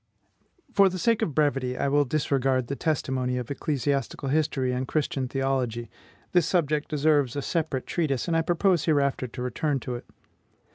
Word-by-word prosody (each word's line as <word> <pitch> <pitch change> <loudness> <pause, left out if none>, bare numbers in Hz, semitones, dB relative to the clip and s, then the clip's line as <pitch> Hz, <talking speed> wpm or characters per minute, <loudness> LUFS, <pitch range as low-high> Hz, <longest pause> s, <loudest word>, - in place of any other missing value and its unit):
For 200 -1 +6
the 185 - -5
sake 225 +5 +2
of 150 - -1
brevity, 135 -4 +1
I - - 0
will 145 +1 +3
disregard 135 -2 +1
the 140 - -1
testimony 130 -5 -1
of 125 +1 -4
ecclesiastical 140 -1 -1
history 140 -3 +1
and 125 +1 -2
Christian 140 -4 -1
theology: 125 -4 -1 0.4
this 175 -3 +3
subject 150 -4 +1
deserves 145 -4 +2
a 145 - -1
separate 155 -6 -1
treatise, 150 -6 -1
and 170 - +1
I 165 - +4
propose 175 0 +2
hereafter 140 -4 +1
to 125 +1 -8
return 135 +3 -1
to 125 - -4
it. 120 - -6
140 Hz, 165 wpm, -26 LUFS, 130-155 Hz, 0.4 s, For